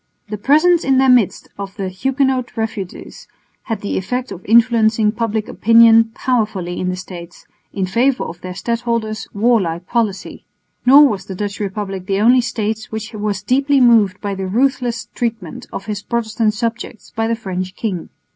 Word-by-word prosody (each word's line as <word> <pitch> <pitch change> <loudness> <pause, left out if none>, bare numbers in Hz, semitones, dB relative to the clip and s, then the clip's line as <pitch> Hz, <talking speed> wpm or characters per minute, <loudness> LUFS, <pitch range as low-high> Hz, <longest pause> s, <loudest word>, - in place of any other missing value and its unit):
The 210 - -4
presence 315 +8 +4
in 265 -1 +2
their 265 0 +5
midst 240 -6 +2
of 195 -1 -6
the 195 - -3
Huguenot 260 +5 -1
refugees 220 -4 -6 0.4
had 225 -4 -3
the 205 - -2
effect 250 +6 -4
of 180 - -8
influencing 225 -1 +4
public 220 -1 -2
opinion 230 0 +5
powerfully 210 -8 -1
in 180 - -1
the 180 - -2
States 180 -2 -10 0.3
in 195 -2 -2
favour 245 +7 +1
of 170 +1 -8
their 185 0 -7
stadholder's 230 -1 -2
warlike 200 -6 +1
policy. 220 -4 -2 0.4
Nor 285 +3 +8
was 195 -7 -3
the 190 - -7
Dutch 205 +1 -4
Republic 195 -2 -4
the 195 -1 0
only 245 +4 +5
State 220 -2 -3
which 220 +1 -6
was 205 -2 -3
deeply 275 +5 +2
moved 225 -6 +4
by 205 -1 -3
the 190 -1 -4
ruthless 245 +2 0
treatment 225 -8 -4
of 195 - -6
his 210 -1 -4
Protestant 220 -1 -1
subjects 230 0 -5
by 225 0 0
the 230 - 0
French 185 -4 -5
king. 190 -7 -4
220 Hz, 165 wpm, -18 LUFS, 195-240 Hz, 0.4 s, Nor